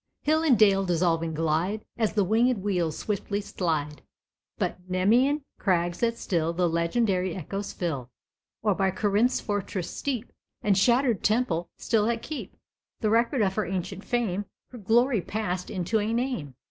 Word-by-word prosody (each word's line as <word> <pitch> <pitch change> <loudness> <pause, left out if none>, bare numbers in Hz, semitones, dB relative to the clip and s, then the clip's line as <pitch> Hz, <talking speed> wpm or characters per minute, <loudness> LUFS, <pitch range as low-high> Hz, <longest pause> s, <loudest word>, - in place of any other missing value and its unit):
Hill 315 +1 +3
and 290 -7 +4
dale 195 -2 +5
dissolving 165 -2 +1
glide, 165 +7 0
As 220 -3 0
the 210 -2 +3
winged 225 +2 +2
wheels 175 -6 0
swiftly 205 -1 -2
slide, 155 -7 -2 0.6
By - - 0 0.2
Nemæan 240 +11 +3 0.2
crags 175 -3 +1
that 230 -1 +1
still 165 -5 -1
The 175 +1 +1
legendary 180 +2 +1
echoes 195 +3 -4
fill. 140 -9 -3 0.5
Or 210 -2 +3
by 190 0 +1
Corinth's 205 +6 +2
fortressed 200 -3 -3
steep, 255 -4 -3 0.3
And 205 -2 +3
shattered 235 +2 +3
temple, 210 -7 +1
still 220 -2 +1
that 230 -1 -1
keep 310 - -6 0.4
The 215 - +1
record 235 +2 +3
of 190 -1 +1
her 215 +1 -1
ancient 190 +1 -4
fame, 205 -5 -1 0.3
Her 245 - -9
glory 230 +2 +3
past 180 -3 -3
into 190 +4 0
a 210 +2 -1
name. 230 - -2
200 Hz, 155 wpm, -27 LUFS, 175-230 Hz, 0.6 s, dale